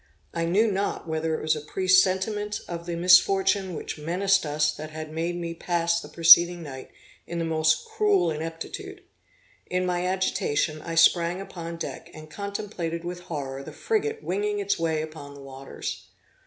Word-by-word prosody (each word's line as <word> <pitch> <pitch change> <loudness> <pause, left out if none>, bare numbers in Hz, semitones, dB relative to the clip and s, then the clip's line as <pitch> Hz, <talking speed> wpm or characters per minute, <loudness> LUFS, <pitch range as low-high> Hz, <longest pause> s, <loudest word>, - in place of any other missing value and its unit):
I 165 0 -1
knew 205 +6 +3
not 195 -2 -2
whether 160 0 -1
it - - -7
was 155 0 +2
a 150 - -5
presentiment 190 +5 +1
of 170 0 -6
the 170 - -2
misfortune 190 +1 +4
which - - -6
menaced 185 +3 +1
us 150 +1 +1
that 155 +1 -8
had 155 0 -7
made 165 +2 -2
me 170 -1 -4
pass 170 0 0
the - - -10
preceding 170 +1 +7
night 135 -3 -9 0.4
in 170 - -5
the 165 - -1
most 155 -1 +1
cruel 195 -5 +2
inquietude. 165 - -6 0.6
In 180 0 -1
my 180 0 0
agitation, 185 -5 0
I 165 +1 -5
sprang 170 +2 +4
upon 170 -3 -7
deck, - - -6
and 155 0 -11
contemplated 195 -4 -4
with 175 0 -5
horror 140 -6 -5
the - - -9
frigate 440 0 -1
winging 205 +3 -1
its 200 -2 -1
way 160 -2 0
upon 155 -2 -9
the 140 - -12
waters. 135 0 -7
170 Hz, 170 wpm, -26 LUFS, 155-190 Hz, 0.6 s, preceding